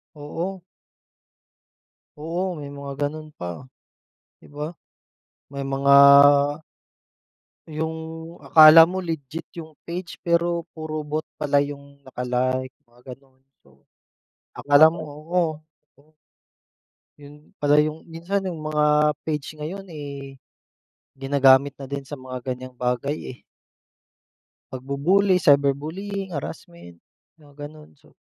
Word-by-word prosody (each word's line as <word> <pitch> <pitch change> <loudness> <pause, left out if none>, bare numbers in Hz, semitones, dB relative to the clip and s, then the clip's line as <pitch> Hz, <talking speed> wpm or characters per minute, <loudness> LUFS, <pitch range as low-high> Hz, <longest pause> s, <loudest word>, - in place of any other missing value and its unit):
Oo. 170 +5 -6 1.6
Oo, 175 +4 -3
may 145 -3 -8
mga 140 0 -8
ganun 155 +1 -8
pa. 90 +8 -7 0.8
'Di - - -17
ba? 150 +3 -6 0.8
May 140 -1 -5
mga 135 0 +1 1.8
yung 160 +1 -4 0.5
akala 155 0 +9
mo 185 +3 -4
legit 160 -3 -6
yung 160 -2 -9 0.2
page 175 +1 -6
pero 170 0 0
puro 155 -1 -5
bot 150 +1 -4 0.2
pala 145 -1 +2
yung 140 0 -10
naka-like, 130 +1 -2
mga 120 0 -25 0.2
ganon. 130 -1 -30 0.2
So 70 0 -27 0.6
akala 145 +3 +5
mo 165 - -8
oo. 155 +5 -2 1.8
Yun 150 +1 -16
pala 145 +1 +4
yung 155 +1 0
minsan 175 +5 -3
yung 180 -4 -5
mga 150 0 +2
page 150 -1 -4
ngayon 170 +6 -7
eh, 140 -4 -9 0.8
ginagamit 135 0 +3
na 140 - -9
din 140 +1 -5
sa 140 +2 -9
mga 130 -1 -8
ganyang 130 0 -5
bagay 125 +3 -2
eh. 125 - -9 1.3
Pagbubully, 145 +10 +1
cyberbullying, 155 +8 +1
harassment, 160 - -8 0.4
mga 145 -3 -20
ganun 155 - -16
so - - -24
150 Hz, 110 wpm, -23 LUFS, 140-165 Hz, 1.8 s, akala